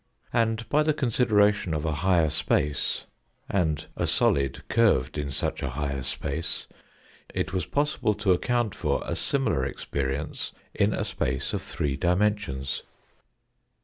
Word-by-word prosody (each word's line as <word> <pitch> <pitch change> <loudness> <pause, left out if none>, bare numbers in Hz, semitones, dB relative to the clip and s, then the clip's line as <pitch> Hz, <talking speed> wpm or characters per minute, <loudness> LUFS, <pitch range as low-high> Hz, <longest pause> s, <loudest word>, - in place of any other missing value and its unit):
And 115 0 +1
by 150 - +3
the 155 -1 +2
consideration 105 - +3
of 75 +1 -2
a 80 - +1
higher 90 -5 +3
space, 75 -2 0 0.4
and 80 -6 0
a - - 0
solid 70 -1 +2
curved 105 - +3
in 75 -2 -2
such 70 - -2
a 70 - -1
higher 70 +1 -2
space, 80 +5 -3 0.7
it - - -1
was 90 -4 -1
possible 145 -7 +1
to 105 -2 +2
account 120 +3 +1
for 75 -5 0
a - - -2
similar 135 - +1
experience 70 +1 -3 0.2
in - - +2
a - - -1
space 65 +1 -1
of - - -1
three 70 -2 -2
dimensions. 90 -7 0
85 Hz, 140 wpm, -27 LUFS, 70-110 Hz, 0.7 s, by